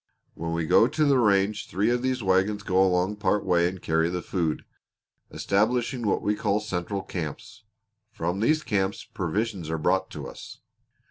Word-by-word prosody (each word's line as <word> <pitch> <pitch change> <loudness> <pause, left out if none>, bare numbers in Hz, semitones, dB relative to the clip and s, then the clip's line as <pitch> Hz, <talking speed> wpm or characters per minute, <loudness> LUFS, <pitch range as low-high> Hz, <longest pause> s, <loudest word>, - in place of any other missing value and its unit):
When 85 0 -4
we 85 -1 -1
go 115 - +5
to 155 +4 +1
the 140 -3 +4
range 100 -2 +2
three 105 +5 +1
of 120 0 0
these 130 -2 -1
wagons 95 +2 +1
go 95 0 +2
along 95 +2 +1
part 105 -1 0
way 85 -2 +3
and 95 +1 -5
carry 80 0 +1
the 90 0 -3
food, 85 -4 -2 0.6
establishing 115 +3 0
what 100 - 0
we 105 - +2
call 105 -1 0
central 95 -1 -3
camps. 85 +5 -7 0.5
From 90 -1 -3
these 155 +8 +2
camps 95 -1 -1
provisions 95 -1 -3
are 80 - -1
brought 75 - +1
to - - -7
us." - - -11
100 Hz, 175 wpm, -26 LUFS, 90-110 Hz, 0.6 s, go